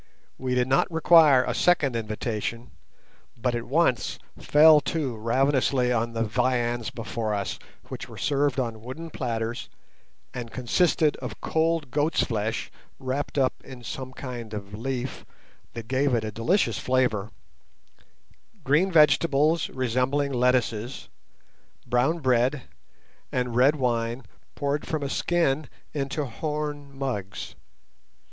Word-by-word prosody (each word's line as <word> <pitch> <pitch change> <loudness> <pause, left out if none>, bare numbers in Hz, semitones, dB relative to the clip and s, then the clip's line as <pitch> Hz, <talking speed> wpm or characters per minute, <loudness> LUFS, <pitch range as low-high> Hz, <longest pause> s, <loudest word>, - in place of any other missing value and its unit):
We 130 -1 -1
did 125 0 +2
not 135 +6 +2
require 160 -5 +6
a - - -2
second 150 -8 +2
invitation, 115 +1 -3 0.7
but 125 +1 0
at 120 -1 -3
once 145 -3 +1 0.2
fell 150 0 +6
to 135 -3 -2
ravenously 130 +2 +1
on 115 0 -1
the 115 0 0
viands 120 0 0
before 110 -1 -3
us, 100 -1 -3 0.3
which - - -7
were - - -11
served 140 -2 +1
on 115 -4 -3
wooden 155 +8 -8
platters, 115 -2 -3 0.6
and 120 -2 -5
consisted 150 +5 +1
of - - -7
cold 160 -4 0
goat's 150 +4 +1
flesh, 110 -1 -2 0.3
wrapped 135 +3 -3
up 130 -2 +3
in 125 -2 -11
some 130 +2 -6
kind 120 -5 -7
of 100 -1 -7
leaf 130 +3 -4 0.5
that 115 -1 -7
gave 130 +1 +2
it 115 - 0
a 110 - -3
delicious 155 - +1
flavour, 125 -5 +1 1.3
green 150 +8 +3
vegetables 155 0 +4
resembling 130 +3 0
lettuces, 125 -1 0 0.8
brown 125 +7 +2
bread, 130 -1 +1 0.7
and 125 -2 -1
red 135 +5 +5
wine 120 -2 -1 0.3
poured 145 +1 -2
from 155 -2 -2
a 140 - -2
skin 155 -4 +1 0.2
into 140 +1 -2
horn 145 +3 -4
mugs. 105 -9 -4
130 Hz, 125 wpm, -26 LUFS, 115-145 Hz, 1.3 s, require